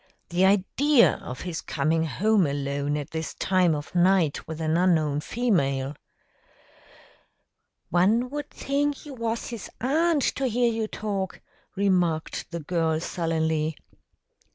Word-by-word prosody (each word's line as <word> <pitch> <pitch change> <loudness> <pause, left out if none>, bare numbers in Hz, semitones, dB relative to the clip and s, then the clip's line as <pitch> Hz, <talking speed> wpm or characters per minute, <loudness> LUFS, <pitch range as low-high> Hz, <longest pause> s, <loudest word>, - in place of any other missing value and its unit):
The 180 +2 +3
idea 235 +8 +4
of 125 - -7
his 175 -3 -4
coming 160 +3 0
home 195 +4 +2
alone 140 +1 -2
at 145 -2 -6
this 160 0 -4
time 185 -4 +2
of 145 0 -7
night 175 -3 +2
with 160 0 -6
an 160 0 0
unknown 160 -5 +2
female!" 140 - 0 2.0
"One 215 - +3
would 295 0 -5
think 285 +1 -2
you 290 - -8
was 230 -2 -3
his 235 -4 -7
aunt, 305 +3 +2
to 270 - 0
hear 240 0 +2
you 225 -1 -1
talk," 200 -4 -4 0.4
remarked 180 -5 0
the 170 0 -5
girl 160 0 0
sullenly. 160 -2 -1
180 Hz, 130 wpm, -26 LUFS, 155-225 Hz, 2.0 s, idea